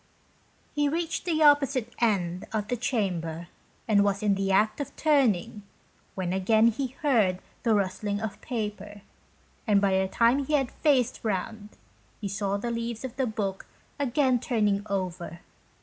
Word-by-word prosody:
He 290 -1 +1
reached 330 +2 -2
the 320 -3 +1
opposite 275 -5 +3
end 185 -6 0
of 215 -1 -2
the 250 - +1
chamber 175 -9 -2 0.4
and 205 -2 +4
was 200 0 0
in 205 -1 +3
the 195 0 -1
act 215 +6 +2
of 285 - -6
turning, 245 - +2 0.5
when 185 -2 -2
again 220 +4 +4
he 255 +3 -4
heard 220 -11 +3 0.2
the 225 -2 +2
rustling 200 +1 -1
of 215 -2 -5
paper, 210 -3 -5 0.7
and 205 -2 +4
by 200 -1 +2
the 190 - +1
time 235 +7 +3
he 305 - -3
had 270 -4 +2
faced 260 -5 +1
round, 210 +1 -4 0.5
saw 200 0 -1
the 235 +4 -3
leaves 230 +1 -4
of 255 -1 -7
the 265 -1 0
book 200 -3 -3 0.3
again 265 -2 +2
turning 210 -5 +1
over. 180 -3 -4
215 Hz, 150 wpm, -27 LUFS, 195-250 Hz, 0.7 s, and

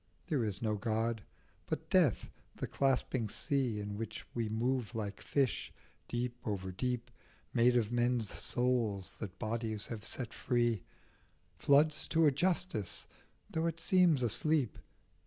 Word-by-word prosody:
There 150 -9 0
is 105 -1 -1
no 110 -1 +1
God; 115 +1 0 0.5
but - - -4
death, - - +3 0.2
the - - -3
clasping 130 -4 +1
sea, 130 -4 0
In 105 0 -4
which 115 -1 -5
we 115 -2 -1
move 120 +1 -1
like 100 -3 -4
fish, 135 -4 0 0.4
deep 120 0 -2
over 95 -3 -3
deep, 120 +5 -2 0.4
Made 120 +1 +5
of 115 -2 +1
men's 120 -2 +1
souls 120 -6 0
that 100 -4 -6
bodies 110 -1 -2
have 110 -3 -5
set 125 +2 -3
free, 120 -3 +1 0.8
Floods 150 +2 +4
to 165 0 +3
a 150 - +6
Justice 170 - 0 0.5
though 160 +1 0
it 165 0 -3
seems 170 -5 +4
asleep. 135 +2 +1
120 Hz, 140 wpm, -34 LUFS, 110-135 Hz, 0.8 s, a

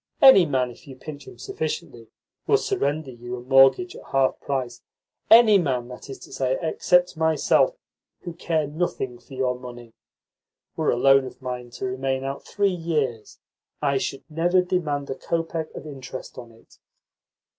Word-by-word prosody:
Any 230 -11 +8
man, 130 -3 0
if 120 - -17
you 135 - -10
pinch 145 +1 -10
him - - -12
sufficiently, 130 -2 -5 0.4
will - - +5
surrender 145 0 -1
you 120 0 -7
a 125 - -8
mortgage 135 +6 +4
at - - -11
half 135 -1 +1
price, 125 -4 -3 0.5
any 220 -3 +8
man, 130 -7 -1
that 125 +2 -10
is 135 - -7
to - - -12
say, 130 0 0
except 180 +2 +2
myself, 160 - +2 0.5
who 175 - -7
care 165 -2 -1
nothing 145 -5 -3
for 125 +3 -13
your 125 -1 -1
money. 120 -2 -10 0.8
Were - - 0
a - - +2
loan 135 +1 +5
of 130 - -10
mine 125 -2 -6
to - - -4
remain 130 +1 -2
out 135 +1 -5
three 200 -2 0
years, 150 -10 -2 0.4
I 140 -2 +1
should 135 - -4
never 175 +3 +2
demand 155 -6 -1
a - - -3
kopeck 165 +1 -3
of - - -8
interest 135 -3 -8
on 120 -2 -10
it." 115 0 -22
135 Hz, 165 wpm, -24 LUFS, 125-165 Hz, 0.8 s, Any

